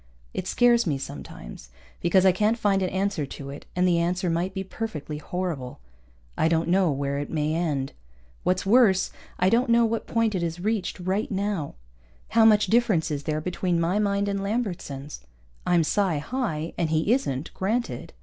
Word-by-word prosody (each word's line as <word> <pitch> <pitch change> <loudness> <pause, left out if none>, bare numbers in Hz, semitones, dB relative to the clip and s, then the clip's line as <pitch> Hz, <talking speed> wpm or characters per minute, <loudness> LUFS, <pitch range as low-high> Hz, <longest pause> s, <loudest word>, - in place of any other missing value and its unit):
It 185 - -4
scares 240 -3 +4
me, 145 -4 +1
sometimes, - - -9 0.3
because 185 +2 +3
I 190 - +7
can't 210 +5 +1
find 200 -4 +2
an 185 - 0
answer 190 -3 -1
to 140 0 -8
it 140 - -10
and 180 0 +3
the 170 -1 +3
answer 180 +1 0
might 175 +3 0
be 190 - -4
perfectly 160 -8 -5
horrible. 155 - -4 0.6
I - - +2
don't 165 0 +1
know 185 -1 +3
where 140 0 -1
it 145 - -4
may 155 -1 0
end. 150 -5 -1 0.5
What's 185 +1 0
worse, 200 -3 +4 0.3
I 185 +1 +3
don't 240 +2 +3
know 235 0 +5
what 225 0 -2
point 230 -2 +1
it 185 - -1
has 170 0 -3
reached 210 0 -1
right 190 +4 -1
now. 195 -6 -2 0.5
How 225 -1 +5
much 215 -1 +6
difference 200 -6 +2
is 145 -1 -3
there 155 -1 -1
between 180 0 -1
my 175 +5 +1
mind 200 -1 +1
and 200 -1 -1
Lambertson's? 180 - -3 0.5
I'm 175 -2 +4
psi 185 +1 +1
high, 165 - -3
and 165 -2 +1
he 160 +8 +2
isn't 155 - -2
granted. 225 +6 -2
180 Hz, 180 wpm, -25 LUFS, 160-210 Hz, 0.6 s, I